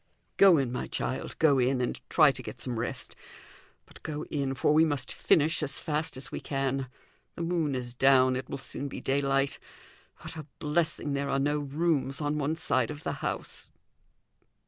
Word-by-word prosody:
"Go 190 Hz, -4 st, +7 dB
in, 135 Hz, -4 st, 0 dB
my 125 Hz, -, -3 dB
child, 130 Hz, -, -3 dB
go 145 Hz, -4 st, +4 dB
in, 130 Hz, +1 st, +2 dB
and 125 Hz, -, -2 dB
try 155 Hz, -4 st, +6 dB
to 130 Hz, -, -8 dB
get 125 Hz, -, -8 dB
some 120 Hz, -3 st, -3 dB
rest. 120 Hz, +1 st, -3 dB, 0.7 s
But -, -, -16 dB
go 150 Hz, 0 st, -5 dB
in, 140 Hz, -2 st, -1 dB
for 150 Hz, -, +2 dB
we 155 Hz, +1 st, +6 dB
must 145 Hz, -5 st, -1 dB
finish 155 Hz, +2 st, +2 dB
as 140 Hz, -3 st, -1 dB
fast 150 Hz, -3 st, -2 dB
as 135 Hz, +2 st, -7 dB
we -, -, -4 dB
can. 135 Hz, -2 st, -2 dB, 0.5 s
The 170 Hz, -, -4 dB
moon 165 Hz, -5 st, 0 dB
is 120 Hz, -1 st, -3 dB
down; 130 Hz, 0 st, +5 dB
it 130 Hz, 0 st, -5 dB
will -, -, -3 dB
soon 140 Hz, +1 st, -3 dB
be -, -, -6 dB
daylight. 135 Hz, 0 st, 0 dB, 0.6 s
What 160 Hz, -, -8 dB
a 155 Hz, -2 st, -7 dB
blessing 150 Hz, -1 st, 0 dB
there 140 Hz, 0 st, -1 dB
are 135 Hz, -, +1 dB
no 145 Hz, +2 st, +1 dB
rooms 145 Hz, -1 st, 0 dB
on 150 Hz, 0 st, -1 dB
one 150 Hz, +2 st, 0 dB
side 130 Hz, -7 st, +1 dB
of 150 Hz, +1 st, -7 dB
the -, -, -1 dB
house. -, -, -4 dB
140 Hz, 190 wpm, -29 LUFS, 130-150 Hz, 0.7 s, Go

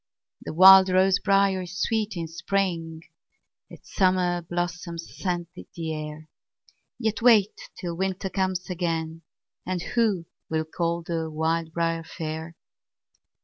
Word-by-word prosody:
The -, -, -6 dB
wild 190 Hz, +1 st, +9 dB
rose 190 Hz, +1 st, +3 dB
briar 195 Hz, -1 st, +2 dB
is 180 Hz, +1 st, -7 dB
sweet 220 Hz, -4 st, -1 dB
in 165 Hz, -1 st, -3 dB
spring, 170 Hz, -2 st, -2 dB, 0.7 s
Its -, -, -15 dB
summer 180 Hz, -2 st, +2 dB
blossoms 175 Hz, 0 st, -5 dB
scent 175 Hz, -3 st, -3 dB
the 165 Hz, -3 st, -6 dB
air; 155 Hz, 0 st, -7 dB, 0.7 s
Yet 220 Hz, -2 st, -2 dB
wait 220 Hz, -4 st, +5 dB, 0.2 s
till 175 Hz, -3 st, -4 dB
winter 190 Hz, +1 st, -2 dB
comes 185 Hz, -2 st, -1 dB
again, 165 Hz, -2 st, -3 dB, 0.4 s
And 180 Hz, -1 st, -3 dB
who 215 Hz, -8 st, +1 dB, 0.2 s
will 160 Hz, 0 st, -1 dB
call 170 Hz, +1 st, -2 dB
the 165 Hz, -1 st, -3 dB
wild 160 Hz, +1 st, -1 dB
briar 165 Hz, 0 st, -1 dB
fair? 160 Hz, 0 st, -6 dB
175 Hz, 125 wpm, -25 LUFS, 165-190 Hz, 0.7 s, wild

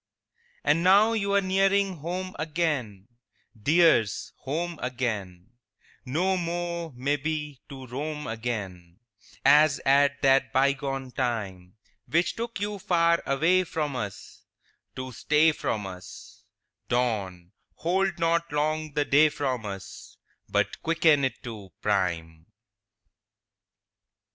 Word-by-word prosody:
IV 480 Hz, +1 st, -39 dB
And 165 Hz, -, +2 dB
now 205 Hz, +5 st, +5 dB
you 200 Hz, -3 st, -1 dB
are 200 Hz, -, +4 dB
nearing 195 Hz, 0 st, +2 dB
home 180 Hz, +4 st, -5 dB
again, 150 Hz, -, -2 dB, 0.5 s
Dears, 145 Hz, -2 st, +3 dB
home 165 Hz, +4 st, -4 dB
again; 110 Hz, -7 st, -4 dB, 0.6 s
No 180 Hz, +8 st, +1 dB
more, 170 Hz, -1 st, -3 dB
may 140 Hz, +4 st, 0 dB
be, 150 Hz, -1 st, -4 dB
to 135 Hz, -2 st, -9 dB
roam 150 Hz, +4 st, -5 dB
again 100 Hz, -7 st, -5 dB, 0.5 s
As 150 Hz, 0 st, +6 dB
at 140 Hz, +1 st, +4 dB
that 135 Hz, -3 st, +4 dB
bygone 135 Hz, 0 st, 0 dB
time, 105 Hz, -8 st, -3 dB, 0.3 s
Which 170 Hz, +2 st, +1 dB
took 230 Hz, -1 st, -5 dB
you 205 Hz, 0 st, -3 dB
far 170 Hz, -2 st, +2 dB
away 165 Hz, +7 st, +3 dB
from 150 Hz, -5 st, -3 dB
us 105 Hz, -5 st, -6 dB, 0.5 s
To 130 Hz, 0 st, -6 dB
stay 150 Hz, +6 st, +3 dB
from 110 Hz, -8 st, -3 dB
us; 95 Hz, -1 st, -11 dB, 0.4 s
Dawn, 100 Hz, -8 st, -1 dB, 0.2 s
hold 190 Hz, +3 st, 0 dB
not 170 Hz, 0 st, +1 dB
long 155 Hz, +1 st, -1 dB
the 145 Hz, 0 st, +1 dB
day 150 Hz, +2 st, +5 dB
from 130 Hz, -6 st, -3 dB
us, 95 Hz, -1 st, -9 dB, 0.3 s
But -, -, 0 dB
quicken 160 Hz, -3 st, +3 dB
it 130 Hz, -1 st, -2 dB
to 105 Hz, -6 st, -8 dB
prime! 85 Hz, -5 st, -1 dB
145 Hz, 115 wpm, -27 LUFS, 115-170 Hz, 0.6 s, As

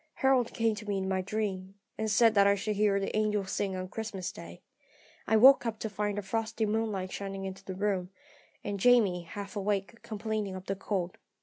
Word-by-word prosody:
Harold 265 Hz, -3 st, +2 dB
came 225 Hz, -1 st, +1 dB
to 210 Hz, 0 st, -8 dB
me 200 Hz, -, 0 dB
in 190 Hz, 0 st, -2 dB
my 190 Hz, -1 st, 0 dB
dream, 195 Hz, -1 st, -3 dB, 0.2 s
and 220 Hz, 0 st, -2 dB
said 225 Hz, +2 st, +5 dB
that 200 Hz, -1 st, +5 dB
I 200 Hz, -, +5 dB
should 210 Hz, +2 st, -2 dB
hear 200 Hz, -1 st, +3 dB
the 195 Hz, -, -3 dB
angels 210 Hz, -2 st, 0 dB
sing 195 Hz, -2 st, -1 dB
on 185 Hz, 0 st, -4 dB
Christmas 205 Hz, -2 st, -5 dB
day. 85 Hz, +1 st, -11 dB, 0.6 s
I 220 Hz, -, +4 dB
woke 265 Hz, +5 st, +8 dB
up 230 Hz, -2 st, -2 dB
to 220 Hz, -, -3 dB
find 205 Hz, 0 st, -2 dB
the 205 Hz, -, -2 dB
frosty 220 Hz, +2 st, -1 dB
moonlight 210 Hz, -3 st, -1 dB
shining 195 Hz, -1 st, -5 dB
into 190 Hz, 0 st, -7 dB
the 190 Hz, -, -6 dB
room, 190 Hz, -2 st, -1 dB, 0.5 s
and 205 Hz, -1 st, -3 dB
Jamie, 210 Hz, -6 st, +4 dB
half 195 Hz, +4 st, -8 dB
awake, 205 Hz, +2 st, -2 dB
complaining 215 Hz, -2 st, -3 dB
of 185 Hz, 0 st, -8 dB
the 195 Hz, -, -2 dB
cold. 185 Hz, -2 st, -3 dB
205 Hz, 205 wpm, -30 LUFS, 190-220 Hz, 0.6 s, woke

